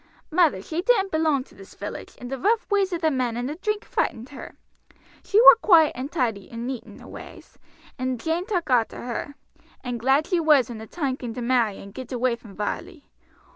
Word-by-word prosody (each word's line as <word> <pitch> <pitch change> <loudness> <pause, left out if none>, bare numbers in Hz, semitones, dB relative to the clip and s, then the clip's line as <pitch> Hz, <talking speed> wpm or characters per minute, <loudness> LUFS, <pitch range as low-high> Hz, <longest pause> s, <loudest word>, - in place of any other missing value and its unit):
Mother 315 - +3
she 325 +8 -3
didn't 395 -2 +2
belong 315 -4 +1
to - - -22
this 195 - -14
village, 205 +1 -7
and 245 +1 -9
the 270 - -3
rough 440 - +2
ways 395 -2 +2
of 345 -1 -3
the 320 -2 +2
men 250 -4 -1
and 245 +1 -2
the 290 - -3
drink 420 +5 -3
frightened 235 +2 -2
her. 285 - -10 0.7
She 410 - +3
war 485 - +10
quiet 325 -6 +6
and 260 +4 -6
tidy 225 - -2
and 230 0 -6
neat 255 -2 -4
in - - -13
her - - -13
ways, - - -12 0.4
and 255 -1 -2
Jane 330 - -2
took 355 - -1
arter 235 -3 +1
her, 250 +4 -5 0.5
and 245 -2 -4
glad 270 +6 +3
she 355 -1 +1
was 300 -7 +4
when 230 -2 -7
the 220 - -9
time 275 -4 -2
came 240 -4 -6
to 250 - -5
marry 235 -5 +1
and 200 0 -11
get 260 -1 -8
away 250 -1 +1
from 220 -4 -15
Varley. 290 - -5
265 Hz, 215 wpm, -24 LUFS, 240-335 Hz, 0.7 s, war